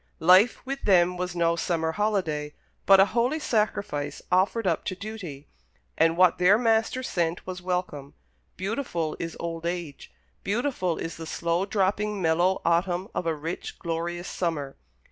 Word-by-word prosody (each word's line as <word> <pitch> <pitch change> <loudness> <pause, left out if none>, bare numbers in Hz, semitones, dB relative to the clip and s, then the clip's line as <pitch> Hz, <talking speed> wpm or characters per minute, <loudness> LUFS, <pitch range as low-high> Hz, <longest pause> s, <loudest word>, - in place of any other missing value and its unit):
Life 185 +8 +5
with 275 +1 -4
them 180 -2 +4
was 180 0 -4
no 170 -1 +2
summer 165 -1 -1
holiday, 165 -7 -1 0.3
but 195 -1 +8
a 195 - +8
holy 245 +6 +2
sacrifice 205 - -1
offered 195 +5 +2
up 170 -4 +1
to 185 - -3
duty, 185 -9 -8 0.5
and 165 +1 +3
what 180 -1 +4
their 185 +4 +6
Master 225 +2 +1
sent 170 -7 -1
was 185 -1 -6
welcome. 180 -6 -3 0.4
Beautiful 190 - -2
is 165 0 -5
old 165 0 -4
age 170 -5 -5 0.3
beautiful 200 - -1
is 165 - -5
the 165 -1 -7
slow 170 +4 -1
dropping 205 +1 0
mellow 175 +2 +2
autumn 175 +3 +1
of 175 - -2
a 165 - +1
rich, 160 +4 -6
glorious 175 +1 -3
summer. 155 -6 -3
180 Hz, 150 wpm, -26 LUFS, 165-200 Hz, 0.5 s, but